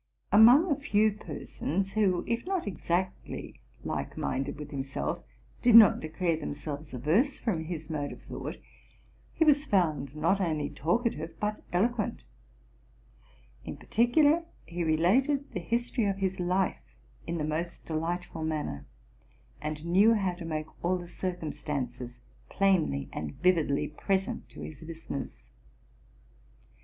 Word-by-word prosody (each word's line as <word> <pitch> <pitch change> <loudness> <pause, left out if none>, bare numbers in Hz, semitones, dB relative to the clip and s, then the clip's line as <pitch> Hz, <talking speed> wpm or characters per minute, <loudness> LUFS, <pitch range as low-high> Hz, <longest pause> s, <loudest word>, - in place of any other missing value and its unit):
Among 245 - +7
a - - +4
few 215 -6 +3
persons, 195 0 -4
who, 195 -5 +2
if 235 0 -1
not 380 -2 -1
exactly 185 -1 -3 0.2
like - - -4
minded 135 - -2
with 150 -1 -8
himself, 135 -1 -3 0.4
did 240 -2 +6
not 220 -4 +9
declare 165 +2 -1
them 145 - -4
selves 145 0 -6
averse 180 - +2
from 170 -9 -2
his 160 -2 -5
mode 150 -3 -3
of - - -11
thought, - - -6 0.8
he 320 - +3
was 295 -1 +4
found, 155 - +1
not 170 +6 +2
only 155 -5 -1
talkative 170 - -1
but 210 0 -2
eloquent: 225 +7 0 1.4
in - - -6
particular, 290 +8 +3 0.2
he 170 0 -3
related 240 - +2
the - - -3
history 235 +5 -1
of 195 -1 0
his 190 -1 -1
life 180 +2 0 0.5
in 170 +1 -2
the 155 - -2
most 160 +3 -3
delightful 165 +1 -3
manner, 150 - -3 0.7
and 150 +1 -4
knew 200 +7 +5
how 195 -4 0
to 175 -1 -8
make 155 -1 -2 0.2
all 180 +2 +2
the 175 -1 -8
circumstances 145 -9 -4 0.3
plainly 180 - +2
and 75 -1 -5
vividly 165 -6 +2
pres 190 +5 0
ent - - -6
to - - -11
his 150 -3 -8
listeners. 160 -4 -7
175 Hz, 135 wpm, -29 LUFS, 155-210 Hz, 1.4 s, not